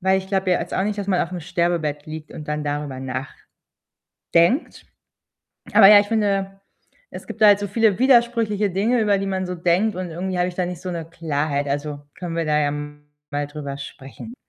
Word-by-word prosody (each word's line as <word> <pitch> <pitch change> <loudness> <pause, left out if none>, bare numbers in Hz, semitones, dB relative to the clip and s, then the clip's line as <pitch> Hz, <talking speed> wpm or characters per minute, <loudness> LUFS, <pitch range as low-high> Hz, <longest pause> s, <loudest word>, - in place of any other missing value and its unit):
weil 190 +1 +3
ich 190 0 -8
glaube 190 -1 0
ja 180 - +2
jetzt - - -5
auch - - +1
nicht, 210 0 -2
dass 200 - -3
man 185 -3 +1
auf 175 - -3
'nem 180 - -4
Sterbebett 165 -3 -1
liegt 155 0 -8
und 150 - -9
dann 150 0 -2
darüber 145 -2 -3 1.1
nachdenkt. 170 - +1 0.9
Aber, 195 - +9
ja, 205 0 +9
ich 205 - 0
finde, 195 -3 -1 0.5
es - - -9
gibt - - -9
da 215 - +8
halt 205 -1 +6
so 205 - -3
viele 215 0 +2
widersprüchliche 235 -5 +3
Dinge, 220 +6 +1
über 205 -2 +3
die 195 - -3
man 190 -1 -2
so 180 0 -4
denkt 180 +5 +1
und 185 -1 -4
irgendwie 180 +3 -3
habe 180 - +2
ich 175 - -11
da 180 - 0
nicht 175 -1 -6
so 185 - -5
'ne 170 -2 -4
Klarheit. 150 -3 -2
Also, 145 +1 -3 0.2
können 175 -2 -5
wir 165 - 0
da 150 0 +2
ja 145 -1 +1
mal 145 0 -7
drüber 145 -2 -6
sprechen. 140 - -10
180 Hz, 210 wpm, -22 LUFS, 150-200 Hz, 1.1 s, Aber